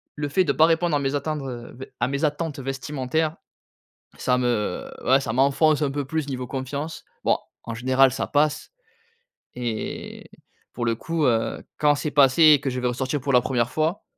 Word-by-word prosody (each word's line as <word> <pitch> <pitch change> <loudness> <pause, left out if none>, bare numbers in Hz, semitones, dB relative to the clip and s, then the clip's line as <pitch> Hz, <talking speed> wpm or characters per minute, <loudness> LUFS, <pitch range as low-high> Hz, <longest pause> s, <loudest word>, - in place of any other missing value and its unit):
le 145 -1 -3
fait 185 +7 +3
de 145 - +2
pas 155 - +5
répondre 165 0 +2
à 145 - +2
mes 135 0 -1
attentes, 150 +1 -2
heu, 120 -3 -7
beh, 130 +2 -10
à - - +1
mes 140 +4 0
attentes 150 0 -2
vestimentaires, 135 +3 -2 0.8
ça 125 -1 +1
me 120 -4 -1 0.2
ouais, 135 +2 +4
ça 115 -4 -3
m'enfonce 140 +4 +3
un 145 - +1
peu 145 +1 -3
plus 155 0 -2
niveau 130 -2 -4
confiance. 140 +5 -5 0.2
Bon - - +3 0.3
en 115 - -5
général 130 +2 +3
ça - - -2
passe 150 +1 +1 0.9
et 120 -3 -5 0.4
pour 120 0 -3
le 115 - +1
coup, 165 +5 -2
heu, 115 -2 0
quand 150 -1 +4
c'est 145 +1 -3
passé 140 +2 +5
et 145 - +4
que 140 - -1
je 125 - -3
vais 125 - 0
ressortir 130 +3 -2
pour 140 +2 -1
la 125 - +6
1re 120 -1 0
fois, 160 +6 -1
135 Hz, 195 wpm, -24 LUFS, 125-150 Hz, 0.9 s, la